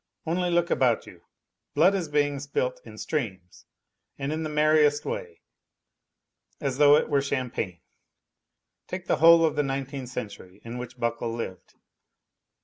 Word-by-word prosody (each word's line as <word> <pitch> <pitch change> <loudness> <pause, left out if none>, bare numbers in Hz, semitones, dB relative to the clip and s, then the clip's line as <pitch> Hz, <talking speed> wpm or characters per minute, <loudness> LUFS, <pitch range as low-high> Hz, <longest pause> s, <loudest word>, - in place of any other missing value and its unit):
Only 175 +2 0
look 175 0 +1
about 125 -3 +2
you: - - -14 0.5
blood 170 +7 +5
is 185 -4 -1
being 145 -1 0
spilt 130 -2 -2
in 110 -2 -12
streams, 95 - -5 0.5
and 140 +2 -3
in 160 - -3
the 155 - -3
merriest 150 -1 +3
way, 450 -3 -5 1.2
as 140 -2 -3
though 145 0 +8
it - - +2
were 140 - +2
champagne. 125 -10 -3 1.1
Take - - -6
the - - +1
whole 165 +3 +7
of 155 - 0
the - - +2
nineteenth 135 -2 -4
century 100 -5 -8
in 120 +2 -6
which 125 0 -8
Buckle 115 0 -1
lived. 115 -6 -7
140 Hz, 145 wpm, -26 LUFS, 120-155 Hz, 1.2 s, though